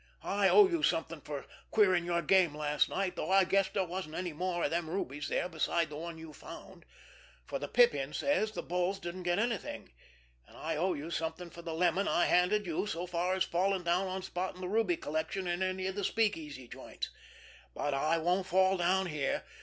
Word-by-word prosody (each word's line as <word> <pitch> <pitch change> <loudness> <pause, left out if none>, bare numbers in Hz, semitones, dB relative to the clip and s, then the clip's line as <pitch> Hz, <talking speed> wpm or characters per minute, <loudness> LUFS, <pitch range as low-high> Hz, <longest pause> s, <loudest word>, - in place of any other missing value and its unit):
I 200 0 +2
owe 415 -2 +8
you 340 -3 -1
something 165 - 0
for 145 -1 -6 0.2
queering 185 -5 +4
your 170 -1 0
game 175 -3 +4
last 150 -1 +1
night, 190 -1 -1
though - - -3
I 195 0 +6
guess 195 +1 +2
there 195 -2 0
wasn't 175 -3 -5
any 180 -3 -3
more 175 +2 -2
of - - +1
them 165 -1 -1
rubies 145 -5 -3
there - - 0
besides 165 -1 0
the - - -6
one 165 +2 -6
you 160 -1 -10
found, - - -11 0.6
for - - -4
the - - -4
Pippin 485 -1 +3
says 280 -7 +1
the - - -5
bulls 180 +2 0
didn't 185 -1 -6
get 175 -1 +1
anything, 230 -1 -2 0.6
and - - -16
I 160 +1 -2
owe 180 +3 +1
you 155 +3 -6
something 165 +1 -3
for 170 - -10
the 165 -1 -5
lemon 180 +3 +2
I've 175 - +2
handed 195 +4 +3
you 175 +4 -1
so 175 -2 -3
far 180 +1 0
in 190 - -4
falling 185 +1 +1
down 175 +3 +1
on 185 0 -4
spotting 185 0 -4
the 180 - -3
ruby 200 -3 +1
collection 160 +5 -3
in 175 +1 -1
any 185 0 -1
of 190 - -1
the 205 +1 -3
speak 215 +1 +2
easy 145 -6 -9
joints; - - -7 0.6
but 145 - -1
I 155 +4 +2
won't 180 +3 +1
fall 190 +1 +3
down 185 +2 +2
here. 150 -5 -1
180 Hz, 210 wpm, -32 LUFS, 165-190 Hz, 0.6 s, owe